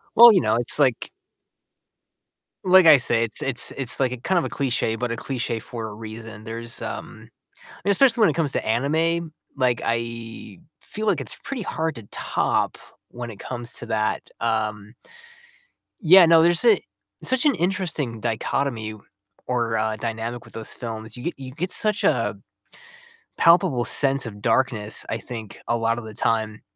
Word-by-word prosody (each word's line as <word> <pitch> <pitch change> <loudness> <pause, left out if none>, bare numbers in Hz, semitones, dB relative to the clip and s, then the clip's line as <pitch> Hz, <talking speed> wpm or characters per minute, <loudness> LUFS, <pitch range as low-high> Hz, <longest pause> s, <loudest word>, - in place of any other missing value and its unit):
Well, 235 +1 +10
you 190 - +3
know, 110 - +1
it's 120 +5 -1
like 130 -5 +1 1.5
like 185 0 +6
I 155 -3 +9
say, 115 -2 +5
it's 115 - +2
it's 135 -2 +5
it's, 135 -1 0
like, 130 -2 +1
a 125 - -5
kind 175 +9 -1
of 170 - +2
a - - -4
cliché, 120 -4 -2
but 125 -1 -2
a - - -2
cliché 115 -3 -4
for 115 -2 -7
a 105 - -8
reason, 110 0 -10
there's, 115 +1 -6
um - - -8 0.3
I - - -20 0.2
mean, 200 - +3
especially 235 +2 +3
when 205 - +6
it - - -1
comes 160 -5 +1
to - - -2
anime, 160 +8 0 0.2
like, 125 -3 0
I 115 -3 -5 0.2
feel 215 +1 -6
like 175 -9 +1
it's - - -7
pretty 275 -4 -5
hard 160 -5 -3
to 115 - -10
top - - -1 0.3
when 120 -1 -7
it 100 - -13
comes 120 -1 -7
to - - -9
that, 110 -1 -2
um 110 -1 -2 1.1
Yeah, 185 +1 +8
no, 165 0 +6
there's 170 0 +4
a 220 -5 +5 0.4
such 260 +4 0
an 290 - +3
interesting 165 - -2
dichotomy, 115 -1 -2 0.5
or 115 -3 -1
uh, 110 0 -1
dynamic 115 +2 -5
with - - -17
those 110 -1 -8
films. 115 -1 -8
You 120 - -9
get 170 - -2
you 130 -1 -8
get 175 +6 -4
such, 215 -2 0
uh, - - +1 0.8
a 455 - -25
palpable 165 -8 +4
sense 135 -2 +4
of 105 -2 -9
darkness, 110 -5 +1
I 115 - -3
think, 110 -4 -9
a 120 - +1
lot 115 +1 0
of 115 - -7
the 110 -1 -10
time 110 -1 -1
120 Hz, 180 wpm, -23 LUFS, 115-160 Hz, 1.5 s, Well